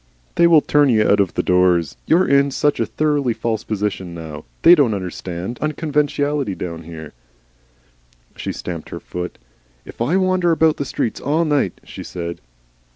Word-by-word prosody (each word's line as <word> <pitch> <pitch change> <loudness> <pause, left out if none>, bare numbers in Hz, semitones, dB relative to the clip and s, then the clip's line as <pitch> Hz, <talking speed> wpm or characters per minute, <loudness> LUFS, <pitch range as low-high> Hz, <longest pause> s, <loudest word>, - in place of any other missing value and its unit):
"They 170 - +4
will 165 -3 +6
turn 145 -1 +3
you 110 -3 +3
out 100 - +4
of 95 -4 +1
doors. 90 -3 +2
You're 175 +3 +4
in 140 0 +4
such 145 +2 0
a - - 0
thoroughly 145 -5 0
false 110 -2 -2
position 100 -4 -3
now. 80 -2 -8 0.2
They 170 - +9
don't 140 -10 +3
understand 95 +3 -5
unconventionality, 150 - -1
down 85 -3 -6
here." 80 -2 -9 1.2
She - - -4
stamped 85 -3 -6
her - - -6
foot. 90 0 -6 0.5
"If - - -11
I 150 +11 +2
wander 185 -2 +2
about 160 -1 +3
the 140 - -3
streets 115 - -3
all 155 +4 +1
night 145 - 0
" - - -39
she - - -10
said. 85 -1 -6
120 Hz, 165 wpm, -20 LUFS, 90-150 Hz, 1.2 s, They